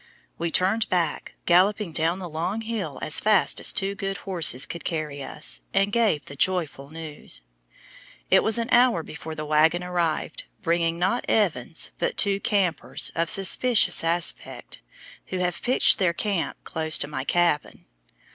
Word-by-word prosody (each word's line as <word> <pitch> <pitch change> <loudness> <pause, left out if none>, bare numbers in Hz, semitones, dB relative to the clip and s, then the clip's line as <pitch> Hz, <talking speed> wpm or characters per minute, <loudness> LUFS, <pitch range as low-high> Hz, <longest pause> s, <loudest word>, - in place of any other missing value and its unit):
We 170 0 -1
turned 195 +7 +1
back, 170 -4 -1
galloping 190 +2 +3
down 165 +3 0
the 185 -2 -6
long 170 +7 -3
hill 215 -11 -4
as 155 - +2
fast 210 -3 +2
as - - 0
two 195 0 -1
good 195 -1 -4
horses 165 -9 +2
could 170 - -8
carry 155 -4 -4
us, 140 +3 -2
and 195 +1 +2
gave 210 -10 +1
the 140 - -10
joyful 155 -4 -1
news. 155 - -8 0.9
It - - +6
was 220 +1 +2
an 230 +1 -2
hour 240 -8 +4
before 155 +1 -8
the 155 - -5
wagon 155 +3 +3
arrived, 170 -3 -2 0.2
bringing 170 -1 +1
not 190 +7 0
Evans 165 - 0
but - - -1
two 200 -1 +2
"campers" 200 -6 0
of 165 0 -1
suspicious 215 +3 +3
aspect, 170 +1 -2 0.5
who 185 - -4
have 180 -1 -2
pitched 250 +1 +4
their 180 -3 +2
camp 195 -1 -2
close 160 0 -2
to - - -3
my 135 -3 -4
cabin! 170 -1 0
175 Hz, 155 wpm, -25 LUFS, 160-200 Hz, 0.9 s, It